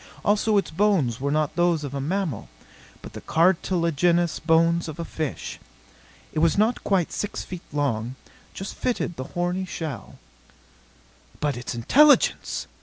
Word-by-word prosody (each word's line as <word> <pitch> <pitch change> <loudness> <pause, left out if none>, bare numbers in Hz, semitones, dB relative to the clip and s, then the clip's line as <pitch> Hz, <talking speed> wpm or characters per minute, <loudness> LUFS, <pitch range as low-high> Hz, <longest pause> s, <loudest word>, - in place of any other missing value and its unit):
Also 210 +1 +3
its 195 - 0
bones 160 - +1
were 140 - 0
not 150 0 0
those 175 -2 +2
of 140 -2 -5
a 140 - -3
mammal, 160 - -2 0.5
but - - -10
the - - -8
cartilagenous 170 -1 +2
bones 165 +1 +3
of 155 - -7
a 170 - -3
fish. 155 -4 -5 0.7
It - - -1
was 165 +3 +3
not 220 +4 +2
quite 185 -5 +1
six 205 - -3
feet 180 -2 -8
long; 130 -5 -1 0.4
just 195 - -6
fitted 235 -8 -2
the 130 - -5
horny 180 +2 0
shell. 155 - -6 1.2
"But 145 -1 0
its 120 0 -5
intelligence!" 285 - +4
165 Hz, 145 wpm, -24 LUFS, 145-185 Hz, 1.2 s, intelligence